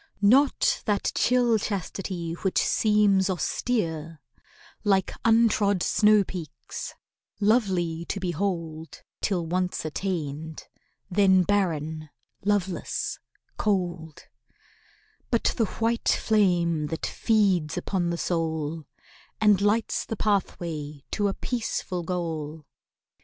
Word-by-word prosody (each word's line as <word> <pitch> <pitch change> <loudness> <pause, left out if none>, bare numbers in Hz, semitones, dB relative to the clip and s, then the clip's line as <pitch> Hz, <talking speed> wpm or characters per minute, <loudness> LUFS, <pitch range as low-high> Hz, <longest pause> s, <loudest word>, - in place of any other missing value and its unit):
Not 280 - +4
that 205 -1 +1
chill 245 -2 +3
chastity 185 -4 -4
which 185 +2 -2
seems 205 -3 +3
austere 165 -4 -2 0.6
(Like 195 -3 +2
untrod 220 -4 +3
snow 210 -1 +4
peaks, 175 -5 -7 0.4
lovely 190 -7 +1
to 200 - -3
behold 170 -3 -3 0.2
Till 180 -5 0
once 180 0 -1
attained—then 175 +3 -1
barren, 160 -6 -1 0.3
loveless, 195 -3 -1 0.4
cold); 175 -6 -2 1.1
But 235 - +1
the 225 - +2
white 230 +3 -1
flame 175 -7 +2
that 160 +1 -3
feeds 190 -9 +1
upon 180 -3 -1
the 170 - -2
soul 160 -2 -2 0.5
And 210 -3 +4
lights 210 +2 +1
the 225 - -5
pathway 160 -8 -2
to 205 -1 +1
a 195 - -2
peaceful 215 -6 -3
goal. 160 -3 -4
185 Hz, 95 wpm, -26 LUFS, 165-210 Hz, 1.1 s, Not